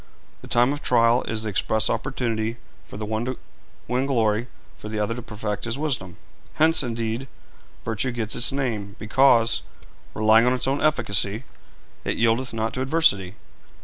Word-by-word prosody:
The - - -11
time 120 +3 +3
of 145 - -6
trial 115 0 +4
is 110 -1 -2
the 110 - -2
express 110 +2 +1
opportunity 115 -4 -2 0.3
for - - -10
the 105 - -4
one 110 +1 -2
to 130 0 -3 0.5
win 125 +3 0
glory, 115 -3 +1 0.3
for 105 - -9
the 110 - -4
other 105 +2 0
to 125 - -6
perfect 105 -3 -4
his 115 +2 -1
wisdom. 130 - -3 0.4
Hence, 160 0 +4
indeed, 115 0 -3 0.6
virtue 115 +3 -1
gets 115 -2 -3
its 120 - +2
name, 110 -7 -3
because, 115 0 +3 0.5
relying 110 +2 +5
on 125 - +4
its 130 - 0
own 135 +2 0
efficacy, 110 -7 +1 0.6
it - - -2
yieldeth 115 +3 +1
not 110 0 -2
to 130 - -3
adversity. 130 - +2
115 Hz, 165 wpm, -24 LUFS, 110-130 Hz, 0.6 s, relying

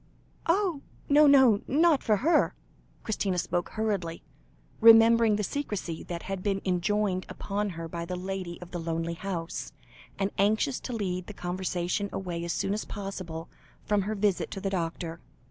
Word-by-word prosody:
"Oh! 350 -4 +2 0.3
no, 295 +1 +7
no, 265 -7 +6
not 310 +1 +4
for 215 - +3
her." 340 - +3 0.5
Christina 200 -4 -1
spoke 175 0 -1
hurriedly, 200 -7 -2 0.6
remembering 225 -1 +7
the 210 - -1
secrecy 205 - -3
that 170 -1 -5
had 195 -1 -4
been 195 0 0
enjoined 185 +1 0
upon 205 +1 -2
her 165 0 -4
by 170 +1 -5
the 180 +1 -4
lady 185 -1 -5
of 180 - -14
the 175 - -4
lonely 165 0 -2
house, 170 -1 -5 0.4
and 195 0 0
anxious 220 +7 +2
to 250 - -6
lead 185 -5 -2
the 210 - -7
conversation 180 +2 -2
away 175 -3 -4
as 170 - -2
soon 195 - -1
as 215 - -2
possible 185 -5 -6 0.4
from 210 -1 +2
her 210 +3 -2
visit 200 -2 +1
to 195 - -5
the 195 0 -2
doctor. 165 -2 -3
195 Hz, 160 wpm, -28 LUFS, 175-215 Hz, 0.6 s, no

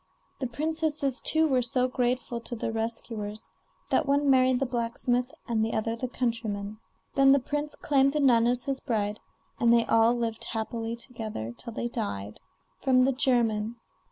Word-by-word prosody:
The 260 - -1
princesses, 300 0 -1
too, 320 0 +4
were 260 -4 +2
so 250 +1 +1
grateful 250 -1 -1
to 240 - -6
their 225 - -3
rescuers, 225 -1 -4 0.4
that - - +2
one 280 0 +3
married 255 -1 +4
the 270 - +1
blacksmith, 245 +1 0 0.2
and 225 -3 +1
the 225 - -1
other 225 +1 -1
the 255 +2 -3
countryman. 215 -4 -3 0.3
Then 270 -1 +6
the 280 - +4
prince 295 +3 -3
claimed 275 -1 +2
the 300 - 0
nun 240 -5 +5
as 245 0 +3
his 275 -2 -2
bride, 215 -4 -2 0.4
and 235 -1 +4
they 235 -1 +4
all 225 +1 +4
lived 230 -2 -3
happily 225 +1 -3
together 220 - -6
till 235 - -8
they 240 - -2
died. 105 - -4 0.4
[From 255 -2 +4
the 270 - +3
German. 235 -4 +1
240 Hz, 170 wpm, -28 LUFS, 225-265 Hz, 0.4 s, Then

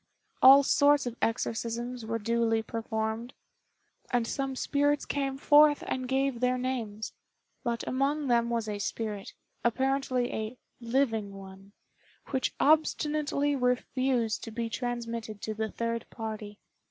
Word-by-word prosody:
All 275 +2 +9
sorts 285 +1 +4
of 240 -1 -4
exorcisms 230 +1 -2
were 230 0 -1
duly 230 0 +1
performed, 220 +1 -3 0.7
and 245 -2 +1
some 270 +2 -2
spirits 290 +2 +1
came 275 -1 -2
forth 295 +1 +5
and 255 -1 -2
gave 265 -1 0
their 250 +1 +2
names. 235 -5 -3 0.5
But 235 -1 -2
among 280 +3 0
them 235 -2 +2
was 230 -2 -1
a 205 -1 -3
spirit, 210 -1 -4 0.3
apparently 260 0 0
a 220 +3 -4 0.2
"living 230 -4 0
one," 195 +1 -12 0.6
which 265 -2 -1
obstinately 295 -1 +2
refused 250 -2 0
to - - -6
be 230 0 -4
transmitted 235 -3 -4
to 220 - -2
the 220 0 -2
third 230 0 -3
party. 215 -2 -6
240 Hz, 130 wpm, -29 LUFS, 225-270 Hz, 0.7 s, All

